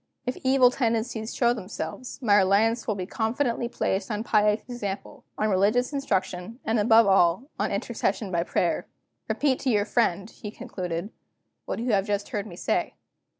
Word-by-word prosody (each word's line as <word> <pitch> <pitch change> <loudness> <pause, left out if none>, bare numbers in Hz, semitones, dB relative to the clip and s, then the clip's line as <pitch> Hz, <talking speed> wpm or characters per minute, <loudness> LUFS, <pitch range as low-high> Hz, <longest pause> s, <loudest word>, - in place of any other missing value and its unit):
If 250 - -2
evil 260 -1 +4
tendencies 230 -2 -1
show 240 -1 +3
themselves, 210 +1 -6
my 205 -3 +5
reliance 210 +5 +3
will 215 - 0
be 185 -2 -4
confidently 235 +3 -1
placed 190 -4 -1
on 215 0 -2
pious 210 -1 +3
example, 205 -6 -6
on 215 0 +1
religious 215 +8 +2
instruction, 200 -4 -2
and, 225 0 +1
above 225 +1 +6
all, 195 - +3
on - - 0
intercession 205 -5 -2
by 170 -1 +1
prayer. 170 - 0 0.4
Repeat 275 -3 +1
to 270 - -1
your 205 -3 +2
friend," 205 -4 +1
he 210 - -8
concluded, 180 -1 -5 0.5
"what - - -3
you 240 +2 -1
have 195 0 +2
just 205 0 -1
heard 210 0 -3
me 175 - -9
say. - - -1
215 Hz, 165 wpm, -26 LUFS, 195-240 Hz, 0.5 s, above